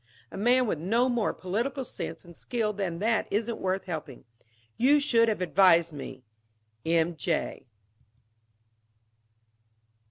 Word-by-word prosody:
A - - -9
man 245 +5 +3
with 185 -9 -2
no 230 +9 +2
more 240 -4 0
political 240 +9 -3
sense - - -7
and 170 -1 -14
skill 220 0 -2
than 190 -4 -3
that 220 +4 0
isn't 220 +3 -1
worth 190 +1 -1
helping. 155 -8 -7 0.5
You 280 +5 +4
should 230 -5 +3
have 210 -4 -2
advised 170 -2 +4
me. 140 -2 -8 0.6
"M. 165 +1 +1
J." 160 -5 -3
200 Hz, 125 wpm, -28 LUFS, 170-235 Hz, 0.6 s, You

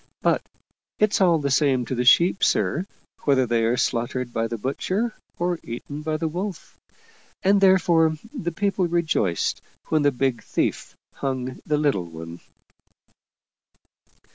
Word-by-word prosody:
But - - +3 0.6
it's 210 -1 +2
all 175 -3 +5
the 140 -2 -2
same 135 -3 +2
to 125 - -4
the 125 0 -1
sheep, 175 +9 +5
sir, 180 +4 +1 0.4
whether 135 -3 +3
they 115 -1 +1
are 120 +2 +1
slaughtered 120 +1 -1
by 115 0 0
the 115 +1 -4
butcher 185 - -2 0.2
or 175 -1 -1
eaten 140 +5 -7
by 155 0 -2
the 160 - -1
wolf. 180 +3 -5 0.7
And 195 +1 +4
therefore, 170 -4 +4 0.2
the 180 - -3
people 195 +1 0
rejoiced 160 - 0 0.3
when 155 - +2
the 145 0 +3
big 130 -1 -1
thief - - -2 0.2
hung 130 -2 -3
the 150 - +2
little 135 - 0
one." 80 +1 -9
145 Hz, 140 wpm, -24 LUFS, 125-175 Hz, 0.7 s, all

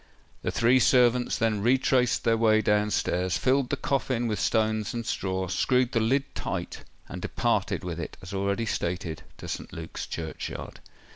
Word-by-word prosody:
The - - -2
three 120 +2 +4
servants 125 -1 +4
then 110 -2 +1
retraced 125 +1 +2
their 115 -1 +3
way 110 -1 +4
down 105 0 +2
stairs, 90 -3 0
filled 130 0 +2
the 140 - -1
coffin 130 -3 0
with 105 -2 -1
stones 110 -1 +1
and 115 -1 -3
straw, 95 -2 -2
screwed 125 +7 +2
the 115 - +2
lid 135 +5 +1
tight, - - -4 0.2
and - - -7
departed - - 0
with 85 -2 -4
it, 80 - -6
as 90 +2 -9
already 100 +3 0
stated, 85 -5 -3 0.2
to - - -9
St. - - -5
Luke's 80 -1 -6
churchyard. 80 -1 -6
110 Hz, 165 wpm, -27 LUFS, 95-125 Hz, 0.2 s, three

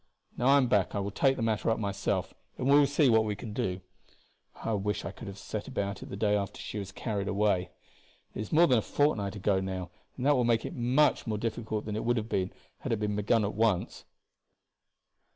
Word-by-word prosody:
Now 125 - 0
I 140 +1 +7
am 135 - +4
back 105 -5 +2
I - - 0
will 100 0 -3
take 135 +5 +2
the 115 - -3
matter 110 0 0
up 115 - +2
myself, 100 -2 -2 0.2
and 130 - -2
we 140 +1 +7
will 145 - +5
see 145 +1 +3
what 110 -2 +5
we 105 -1 -2
can 105 +1 -7
do. 95 -2 -2 0.7
I 115 - -3
wish 105 0 -1
I - - -3
could - - -10
have 100 0 -7
set 105 0 -5
about 100 -1 -3
it - - -9
the - - -5
day 105 0 +2
after 100 0 -3
she 105 - -5
was 100 -1 -6
carried 100 -2 -3
away. 100 -3 +1 0.6
It - - -7
is 105 - -6
more 165 +3 +6
than 125 -7 +4
a - - -1
fortnight 105 -8 0
ago 100 -1 +1
now, 95 -1 -4 0.3
and 130 - -3
that 145 0 +5
will 125 - +2
make 115 -1 +2
it - - -5
much 125 +2 +2
more 110 -1 -1
difficult 110 -1 -3
than 105 -1 -3
it 110 - -2
would 120 +1 +1
have 110 0 -3
been 95 -2 0 0.3
had - - -4
it 115 - +1
been 105 -1 -1
begun 105 +1 +2
at 100 - -2
once." 110 -5 0
105 Hz, 240 wpm, -29 LUFS, 100-120 Hz, 0.7 s, I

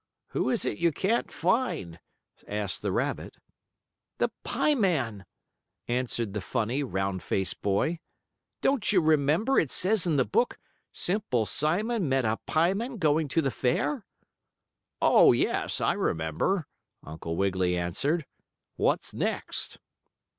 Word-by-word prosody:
"Who - - 0
is - - 0
it - - -2
you 170 - +3
can't 210 +9 0
find?" 170 - -1 0.5
asked 105 -1 -2
the - - -1
rabbit. - - -2 0.8
"The - - +1
pie 300 - +2
man," 130 - 0 0.6
answered 120 -3 -1
the 105 - -3
funny, 115 +7 -1
round 95 -7 -2
faced 95 -2 -2
boy. 105 - 0 0.6
"Don't 270 -8 +2
you 195 - +5
remember, 160 - +3
it 155 - 0
says 190 +3 +1
in 160 - +2
the 130 -3 +3
book, 240 - +1 0.3
'Simple 180 - 0
Simon 180 - 0
met 130 -2 +2
a 110 0 +1
pie 170 +4 +3
man 235 +5 -4
going 155 -3 +2
to 160 +4 +1
the 135 - 0
fair?'" 200 - -1 1.0
"Oh, - - +7
yes, - - 0
I - - +2
remember," 80 - 0 0.4
Uncle 80 +2 -6
Wiggily 95 -1 +1
answered. 140 - -1 0.5
"What's - - 0
next?" - - -2
145 Hz, 130 wpm, -28 LUFS, -, 1.0 s, Oh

